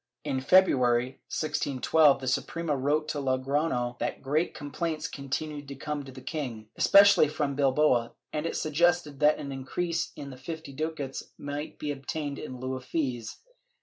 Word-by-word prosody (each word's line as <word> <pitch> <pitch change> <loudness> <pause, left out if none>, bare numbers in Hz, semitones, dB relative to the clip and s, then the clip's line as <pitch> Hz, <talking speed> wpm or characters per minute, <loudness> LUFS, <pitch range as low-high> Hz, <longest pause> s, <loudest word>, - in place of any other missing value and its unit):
In 130 - -1
February, 130 -7 +4
1612, 145 -1 +2
the 130 - -5
Suprema 155 +4 -1
wrote 145 +3 +1
to 150 - -2
Logrofio 130 -2 0
that - - -3
great 150 +5 0
complaints 155 +2 -3
continued 145 +1 -4
to 140 - -7
come 145 +1 -4
to 135 - -10
the 130 0 -11
king, 120 -9 -5
especially 200 -5 +7
from 145 -1 -1
Bilbao, 135 -3 +2 0.2
and 150 +2 -1
it - - -3
suggested 155 -2 +1
that 150 0 +5
an 140 - -6
increase 165 +5 -2
in 140 -1 -7
the 130 - -10
fifty 160 +1 -7
ducats 150 -2 -3 0.2
might 145 +1 -5
be 150 - -3
obtained 140 +1 -4
in 130 - -6
heu 130 +1 -3
of 130 - -10
fees. 125 -7 -2
145 Hz, 160 wpm, -28 LUFS, 130-155 Hz, 0.2 s, especially